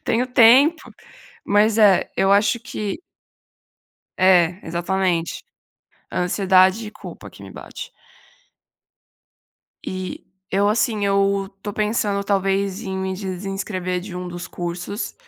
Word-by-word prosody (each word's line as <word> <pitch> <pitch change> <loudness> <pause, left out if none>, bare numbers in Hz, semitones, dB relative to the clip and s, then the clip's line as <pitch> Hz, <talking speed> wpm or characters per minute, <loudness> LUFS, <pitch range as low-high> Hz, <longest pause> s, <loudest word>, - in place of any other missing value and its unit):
tenho 240 +3 +1
tempo". 260 +7 +5 0.6
Mas 210 +2 +3
é, 205 -4 +4
eu 195 0 +3
acho 205 +3 +3
que 210 - -5 1.2
É, 180 -1 +4
exatamente, 175 0 -1 0.7
a - - -2
ansiedade 190 +3 +3
e - - -9
culpa - - -11
que - - -14
me - - -11
bate. - - -9 2.0
E 185 -1 -6 0.2
eu, 200 +2 +2
assim, 215 -1 +1
eu 195 0 +1
estou 205 +1 -7
pensando 210 -1 -1
talvez 195 +1 0
em 190 -1 -4
me 190 0 -2
desinscrever 185 -1 -4
de 185 0 -9
um 180 0 -5
dos 175 +1 -7
cursos 175 +5 -5
195 Hz, 120 wpm, -21 LUFS, 185-210 Hz, 2.0 s, tempo